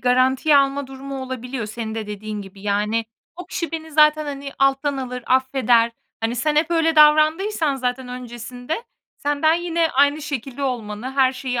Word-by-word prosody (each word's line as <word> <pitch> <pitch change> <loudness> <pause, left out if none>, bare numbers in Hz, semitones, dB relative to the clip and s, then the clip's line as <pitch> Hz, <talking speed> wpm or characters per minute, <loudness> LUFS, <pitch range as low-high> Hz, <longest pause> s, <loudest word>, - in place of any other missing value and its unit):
garantiye 260 +4 +3
alma 275 0 +2
durumu 270 0 -7
olabiliyor 250 -2 -5
senin 220 0 -5
de 220 -2 -4
dediğin 210 0 -5
gibi. 195 0 -13
Yani, 210 +2 0 0.3
"O 360 - -8
kişi 335 -1 -4
beni 320 -1 -5
zaten, 305 0 +5
hani, 280 -1 -5
alttan 275 +1 +2
alır, 250 -2 -5
affeder." 255 -3 +3 0.3
Hani, 230 +2 -1
sen 300 +4 0
hep 320 +2 +2
öyle 325 -1 +2
davrandıysan 310 +1 +4
zaten 250 0 -3
öncesinde, 245 - -6 0.3
senden 290 +2 +2
yine 335 -1 0
aynı 285 +3 +3
şekilde 275 -1 -5
olmanı 240 -2 -3
her 265 -1 +3
şeyi 255 -2 -3
265 Hz, 160 wpm, -21 LUFS, 240-300 Hz, 0.3 s, zaten